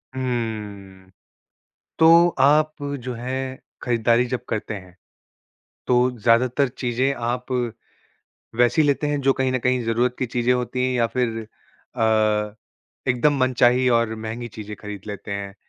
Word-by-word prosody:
हुँ। 105 -7 -4 0.9
तो 165 +2 +7
आप 150 +3 +4 0.3
जो 125 0 -4
है 120 +2 -5 0.5
ख़रीदारी 120 0 +2
जब 125 0 -4
करते 110 0 -3
हैं, 95 -2 -11 0.9
तो 125 0 +3
ज़्यादातर 125 +5 +3
चीज़ें 125 +2 -1
आप 125 +1 -3 1.0
वैसी 120 +6 +3
लेते 145 0 +1
हैं 145 0 0
जो 135 0 +3
कहीं 130 -1 0
न 130 - 0
कहीं 125 +1 +1
ज़रूरत 120 +2 +1
की 130 - 0
चीज़ें 120 +1 0
होती 125 0 -2
हैं 130 - 0
या 120 -1 +2
फ़िर 115 -3 0 0.6
अ, 110 -2 +1 0.5
एकदम 140 +4 +2
मनचाही 130 0 +3
और 110 -1 -1
महँगी 110 +2 -6
चीज़ें 105 -1 -8
ख़रीद 105 -2 -7
लेते 100 0 -7
हैं, 100 -1 -5
120 Hz, 140 wpm, -22 LUFS, 110-130 Hz, 1.0 s, तो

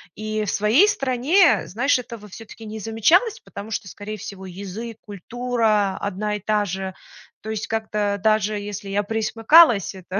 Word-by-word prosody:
И 215 0 -3
в - - -3
своей 225 - +4
стране, 280 +3 +3
знаешь, 255 +8 +1
этого 230 -3 -9
всё-таки 225 +2 -12
не 215 +1 -7
замечалось, 320 - +2
потому 205 +2 -9
что, 200 - -4
скорее 210 +2 -7
всего, 190 -1 -9
язык, 200 +5 -7
культура 215 -1 -1
одна 210 +1 -3
и - - -4
та 210 +1 0
же. 190 0 -4 0.5
То 220 - -8
есть 215 -1 -3
как-то 210 -2 -2
даже 215 -1 +2
если 205 -1 -7
я 205 +1 0
пресмыкалась, 225 - +4
это 185 +1 -5
215 Hz, 160 wpm, -22 LUFS, 200-230 Hz, 0.5 s, своей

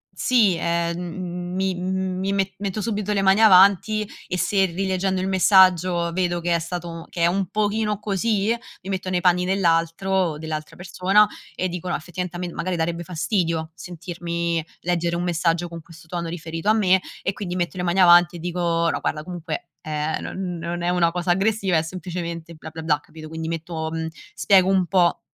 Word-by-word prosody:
sì, 220 -8 +3
ehm, 170 0 0
m 180 0 -5
mi 190 0 0
mi 185 +1 -2
me 195 -1 0
metto 200 +1 -3
subito 210 -1 -1
le 200 -1 +1
mani 195 +3 +4
avanti 200 +1 +5 0.2
e 180 - -2
se, 195 +1 +2
rileggendo 190 +1 -1
il 190 - -1
messaggio, 185 -2 +4
vedo 175 -1 0
che 170 0 0
è 170 - +2
stato 170 0 -6
che 170 - -5
è - - +5
un 185 +2 +1
pochino 210 +1 0
così, 210 +2 0 0.3
mi 190 - -7
metto 190 -1 -3
nei 180 -1 0
panni 180 0 +3
dell'altro 180 -1 +1
dell'altra 155 0 -5
persona 190 +3 +3 0.3
e 185 - -1
dico: 180 0 -5
"No, - - 0
effettivamente 175 +2 -5
a - - -7
me 175 -1 -4
magari 175 +3 -2
darebbe 170 +1 -1
fastidio 165 -2 -1
sentirmi 170 0 -3 0.2
leggere 170 -1 0
un 175 - -2
messaggio 170 0 0
con 165 -1 -8
questo 165 0 -16
tono, 170 0 -4
riferito 165 +2 -4
a - - +6
me." 190 -4 +3 0.2
E 195 - 0
quindi 185 -3 -5
metto 175 +1 -2
le 180 - -2
mani 175 +2 +1
avanti 175 -1 +7
e - - -7
dico: 170 -1 0
"No - - -2
guarda 150 0 -2
comunque, 170 -2 -6
ehm, 155 0 -2
non 180 -2 -4
non 170 +1 -4
è 175 - +1
una 175 -2 +2
cosa 175 +1 -1
aggressiva, 195 -1 +2
è 160 - +3
semplicemente 170 -1 -6
bla, 160 0 -10
bla, 160 0 -8
bla." 150 -2 +2
Capito, 155 +1 -12
quindi 160 0 -5
metto 165 -1 -4
mhmm, 160 0 -3 0.3
spiego 190 -2 +4
un 190 -2 +3
po' 175 -1 +2
175 Hz, 190 wpm, -23 LUFS, 170-190 Hz, 0.3 s, avanti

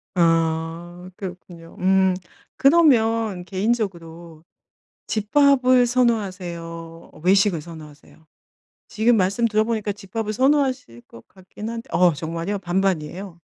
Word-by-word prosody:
아 165 +1 0
그렇군요. 175 -3 -10
음 190 0 +3 0.4
그러면 230 - +3
개인적으로 175 -6 -3 0.6
집밥을 255 +2 +3
선호하세요? 180 -9 -3
외식을 190 -2 +3
선호하세요? 155 -1 -14 0.6
지금 225 +2 +2
말씀 200 +5 +1
들어보니까 215 -1 0
집밥을 215 +2 -5
선호하실 260 - 0
것 115 - -16
같긴 195 +3 -10
한데 230 0 -7
어 180 -1 +4
정말요? 165 +6 -4
반반이에요? 180 -1 -2
190 Hz, 265 characters per minute, -22 LUFS, 170-225 Hz, 0.6 s, 어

